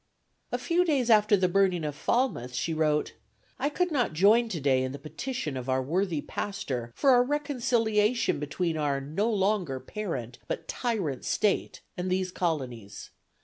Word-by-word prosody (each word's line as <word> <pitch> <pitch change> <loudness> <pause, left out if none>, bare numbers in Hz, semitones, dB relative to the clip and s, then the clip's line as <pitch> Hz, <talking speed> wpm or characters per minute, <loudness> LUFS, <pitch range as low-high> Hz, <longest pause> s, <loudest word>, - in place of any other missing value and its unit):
A - - 0
few 350 +1 +1
days 275 -8 +2
after 210 -1 +5
the 185 -1 +2
burning 185 -2 +2
of 150 -1 -2
Falmouth 145 - 0
she 160 +7 -1
wrote, 155 -1 +1 0.5
"I 280 +3 +1
could 360 +4 0
not 245 - +1
join 215 +8 +4
today 140 -8 +1
in 130 0 -2
the - - -5
petition 155 - -5
of 130 0 -5
our 130 0 +1
worthy 170 +2 0
pastor 130 - -4
for 275 -2 +4
a 245 - +6
reconciliation 245 - +1
between 160 +3 -2
our 145 -2 0
no 155 +11 -1
longer 195 -9 0
parent, 130 - -5
but 165 - -4
tyrant 195 - -2
state 210 - 0
and 180 +1 -3
these 185 0 0
colonies. 130 - -4
185 Hz, 160 wpm, -28 LUFS, 145-230 Hz, 0.5 s, a